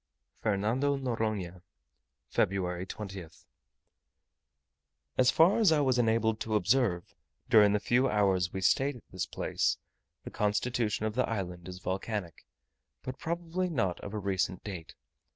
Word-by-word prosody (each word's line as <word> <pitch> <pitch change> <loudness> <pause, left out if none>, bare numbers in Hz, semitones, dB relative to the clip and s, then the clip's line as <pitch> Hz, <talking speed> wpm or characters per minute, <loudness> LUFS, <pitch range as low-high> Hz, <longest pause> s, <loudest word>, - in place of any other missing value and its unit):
FERNANDO 115 +7 +1
NORONHA, 110 -8 -2 0.7
Feb. 90 -1 0
20th. 95 -6 -8 1.7
As 130 -1 +4
far 170 +10 +5
as 215 -7 +5
I 155 - +4
was 130 -3 +2
enabled 110 -1 +2
to 110 -1 -2
observe, 105 -5 +1 0.4
during 105 -3 +7
the 105 - +2
few 130 +5 +2
hours 95 -4 +2
we 95 - -4
stayed 135 +9 +2
at 120 - -15
this 90 - -3
place, - - 0 0.5
the - - -8
constitution 105 +1 0
of 110 - -1
the 125 +2 0
island 90 -5 -4
is 90 -1 -7
volcanic, 95 0 -4 0.6
but 130 0 -6
probably 170 +2 -2
not 95 - -1
of 100 +1 -7
a - - -1
recent 95 -2 -1
date. 85 -5 -7
105 Hz, 135 wpm, -30 LUFS, 95-125 Hz, 1.7 s, during